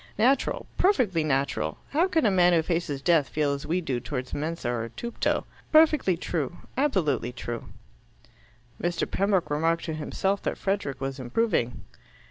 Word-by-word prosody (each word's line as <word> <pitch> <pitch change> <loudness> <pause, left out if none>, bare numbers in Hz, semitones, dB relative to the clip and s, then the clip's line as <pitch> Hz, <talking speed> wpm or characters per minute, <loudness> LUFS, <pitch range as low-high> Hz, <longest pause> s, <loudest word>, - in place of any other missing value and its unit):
Natural, 255 +6 +2
perfectly 240 - +3
natural. 135 - 0
How 330 +6 +3
can 325 -7 +1
a 210 - +4
man 180 -2 +5
who 165 -2 +3
faces 160 -5 -2
death 165 -5 +3
feel 150 -2 +1
as 140 - -5
we 180 +3 +1
do 130 -7 -2
towards 125 +1 -5
mensa 160 0 -3
or 115 -1 -2
tupto?" 230 - -2 0.3
"Perfectly 305 - +5
true. 165 -2 -3 0.2
Absolutely 180 - +1
true." 120 -1 -5 1.2
Mr. 175 0 0
Pembroke 195 -5 +1
remarked 165 +3 +1
to 160 - -3
himself 190 +6 -1
that - - -2
Frederick 195 -9 -2
was 135 0 -4
improving. 125 - 0
165 Hz, 150 wpm, -27 LUFS, 135-200 Hz, 1.2 s, man